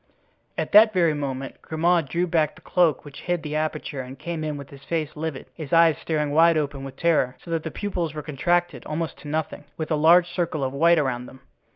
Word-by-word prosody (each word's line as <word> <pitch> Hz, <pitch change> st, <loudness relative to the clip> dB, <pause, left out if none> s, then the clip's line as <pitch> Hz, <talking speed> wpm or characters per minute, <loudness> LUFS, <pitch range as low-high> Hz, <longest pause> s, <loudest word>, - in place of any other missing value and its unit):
At -, -, -2 dB
that 215 Hz, +1 st, +7 dB
very 170 Hz, -4 st, +3 dB
moment 135 Hz, -2 st, -5 dB
Grimaud 165 Hz, -1 st, +1 dB
drew 175 Hz, +4 st, 0 dB
back 160 Hz, -3 st, +1 dB
the -, -, -17 dB
cloak 165 Hz, -6 st, +1 dB
which 145 Hz, -1 st, -10 dB
hid 175 Hz, -2 st, -2 dB
the 150 Hz, -1 st, -4 dB
aperture 155 Hz, -2 st, -2 dB
and 130 Hz, +1 st, -9 dB
came 170 Hz, -2 st, -5 dB
in 150 Hz, -1 st, -3 dB
with 140 Hz, -1 st, -10 dB
his 140 Hz, -1 st, -13 dB
face 160 Hz, -2 st, -3 dB
livid, 155 Hz, -2 st, -4 dB
his 155 Hz, -4 st, -8 dB
eyes 165 Hz, -2 st, +5 dB
staring 150 Hz, -2 st, -1 dB
wide 165 Hz, +2 st, +5 dB
open 140 Hz, -2 st, -2 dB
with 135 Hz, -1 st, -8 dB
terror, 140 Hz, -6 st, +1 dB
so 170 Hz, -, -8 dB
that 165 Hz, -1 st, 0 dB
the 160 Hz, -, -5 dB
pupils 175 Hz, -4 st, -3 dB
were 150 Hz, -, -5 dB
contracted 175 Hz, +4 st, 0 dB
almost 160 Hz, +1 st, -4 dB
to -, -, -11 dB
nothing, 155 Hz, 0 st, -3 dB
with 160 Hz, 0 st, -4 dB
a -, -, +3 dB
large 170 Hz, +4 st, +5 dB
circle 170 Hz, -5 st, -2 dB
of 130 Hz, 0 st, -2 dB
white 170 Hz, +4 st, +4 dB
around 125 Hz, -4 st, -1 dB
them. 130 Hz, -, -14 dB
155 Hz, 225 wpm, -24 LUFS, 145-170 Hz, -, that